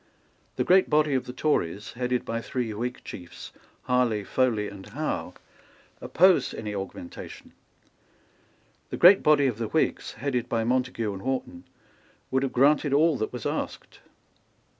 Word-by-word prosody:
The - - 0
great 185 +1 +4
body 150 -1 +3
of 130 - 0
the - - -5
Tories, 105 - -1
headed 125 0 -2
by 115 0 -3
three 120 -3 -3
Whig 120 +4 -4
chiefs, 90 -3 -10 0.3
Harley, 125 -5 +1
Foley 110 -2 0
and 100 -1 -10
Howe, - - -4 0.7
opposed 185 +1 +3
any 105 -1 -5
augmentation. 95 -3 -8 1.4
The - - -4
great 185 +3 +7
body 150 -2 +4
of 120 -4 -1
the 115 - -2
Whigs, 160 - -1
headed 125 -3 -2
by 115 -1 0
Montague 125 -3 -1
and 95 - -8
Wharton, 135 - -4 0.7
would 130 0 +2
have 135 -2 -1
granted 145 +2 +3
all 160 +1 +4
that 110 - -3
was 125 -3 -7
asked. - - -4
125 Hz, 145 wpm, -26 LUFS, 110-145 Hz, 1.4 s, great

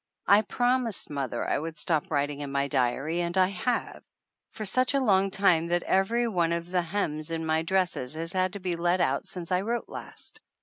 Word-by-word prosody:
I 200 +1 +6
promised 245 -2 -1
mother 135 -4 -2
I - - +1
would 160 +1 -6
stop 160 +4 0
writing 145 -2 -1
in 145 -1 -5
my 140 0 0
diary 140 +5 0
and 170 +1 -2
I 185 0 +5
have 230 +6 -2 0.5
for 215 - -6
such 255 +7 +2
a - - +4
long 195 -6 +3
time 185 -4 +3
that 175 0 0
every 230 +6 +2
one 170 -6 +1
of 170 +1 -4
the 180 -1 +2
hems 160 -4 -2
in 165 -1 -3
my 160 0 +1
dresses 175 -6 0
has 165 +3 -3
had 185 0 +1
to 200 - -6
be 180 -2 -2
let 175 +2 +1
out - - 0
since 175 -2 -6
I 180 0 +2
wrote 235 +4 -2
last. - - -6
175 Hz, 210 wpm, -28 LUFS, 160-195 Hz, 0.5 s, I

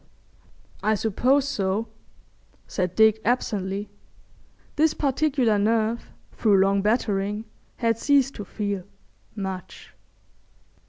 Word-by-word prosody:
'" - - -30
"I - - +3
suppose 255 +7 +2
so," 200 -1 -1 0.8
said 185 -2 -2
Dick, 220 0 +5
absently. 205 -4 -1 0.8
This 310 +1 +3
particular 270 -6 +1
nerve 225 +2 0 0.2
through 210 -3 +3
long 195 +1 +3
battering 210 -1 0 0.3
had 230 -2 +1
ceased 275 -1 +3
to 205 - -5
feel—much. 185 - -7
215 Hz, 95 wpm, -25 LUFS, 195-235 Hz, 0.8 s, Dick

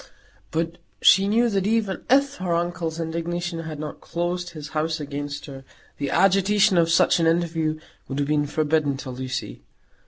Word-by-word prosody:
But 165 +1 -2 0.2
she 195 +1 +6
knew 230 +4 +3
that 200 -3 0
even 215 -3 0
if 280 +2 +3
her 180 -2 -1
uncle's 170 -1 -2
indignation 170 +1 -3
had 160 -2 -6
not 150 -1 -6
closed 175 +1 -3
his 150 -3 -8
house 155 +1 -1
against 145 0 -5
her, 135 -2 -9 0.4
the 140 -1 -1
agitation 195 +3 +4
of 165 -1 +3
such 170 +1 +4
an 165 - +3
interview 165 -2 0 0.3
would 135 - -4
have 145 -1 0
been 150 -1 +1
forbidden 150 -2 +1
to 135 -1 -7
Lucy. 130 - -5
165 Hz, 165 wpm, -24 LUFS, 150-180 Hz, 0.4 s, she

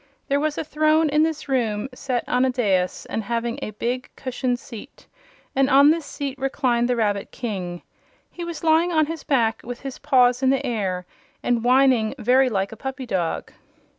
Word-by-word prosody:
There 280 +1 +2
was 305 0 -1
a - - -1
throne 310 +1 +2
in 300 +1 +3
this 310 -1 -1
room, 230 -4 0
set 250 -1 -2
on 250 +1 +2
a 260 - +3
dais 195 -8 0
and 225 - -3
having 235 +2 -2
a - - -3
big, 245 +4 -3
cushioned 255 -1 -2
seat, 240 +2 -12 0.5
and 270 0 +3
on 280 +2 +7
this 320 -2 -2
seat 280 -2 -5
reclined 250 -3 +1
the 250 - +2
Rabbit 205 -3 0
King. 185 -7 -5 0.5
He 350 - -7
was 340 -1 -6
lying 325 +2 +3
on 315 -2 +3
his 325 0 -6
back, 230 -5 +1
with 245 0 -7
his 270 -2 -7
paws 250 -3 +3
in 260 - +3
the 270 +1 +1
air, 195 -7 -2 0.4
and 240 -2 +1
whining 255 -2 +3
very 255 +2 +3
like 195 -3 -1
a - - -8
puppy 265 +2 -5
dog. 180 -7 -2
255 Hz, 190 wpm, -23 LUFS, 230-280 Hz, 0.5 s, on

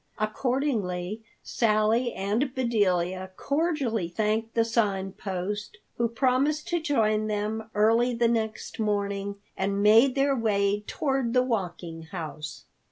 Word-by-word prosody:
Accordingly 215 -4 -1 0.2
Sally 225 +2 +2
and 220 +8 -1
Bedelia 190 -7 +1
cordially 280 - 0
thanked 215 +4 -1
the 230 -1 +3
Sign 200 -4 0
Post, 200 +2 -4 0.2
who 235 - +2
promised 265 +6 +1
to 345 -1 0
join 215 -8 +1
them 215 +1 -2
early 230 +3 +3
the 235 0 +3
next 225 -1 -2
morning, 200 -1 -1 0.2
and 200 +1 -1
made 230 +5 +6
their 275 0 +2
way 205 -3 +1
toward 270 -5 -1
the 250 - +5
Walking 175 -8 -3
House. 155 -2 -7
215 Hz, 120 wpm, -27 LUFS, 200-240 Hz, 0.2 s, made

